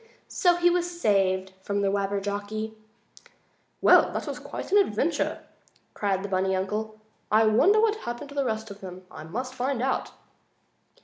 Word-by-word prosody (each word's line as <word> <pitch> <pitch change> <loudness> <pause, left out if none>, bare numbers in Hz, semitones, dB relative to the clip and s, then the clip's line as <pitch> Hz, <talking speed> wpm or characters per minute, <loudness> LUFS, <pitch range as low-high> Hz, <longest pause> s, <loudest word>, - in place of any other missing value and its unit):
So 355 -1 +3
he 350 0 +3
was 350 0 -1
saved 190 - +1
from 200 +1 -1
the 195 - +2
Wabberjocky. 205 +2 -2 1.1
"Well! - - +6
That - - -3
was - - -5 0.3
an 410 - +6
adventure!" 400 - 0 0.5
cried 195 -2 -1
the - - -3
bunny 190 0 0
uncle. 215 +3 -3 0.3
"I 220 +1 +5
wonder 295 - +5
what 435 -1 +3
happened 240 - -6
to 285 - -11
the 280 - +1
rest 220 -3 -3
of 200 - -11
them? 185 -1 -9
I 155 - -9
must 250 +10 -5
find 260 0 -1
out." 260 +2 -1
215 Hz, 160 wpm, -26 LUFS, 195-275 Hz, 1.1 s, Well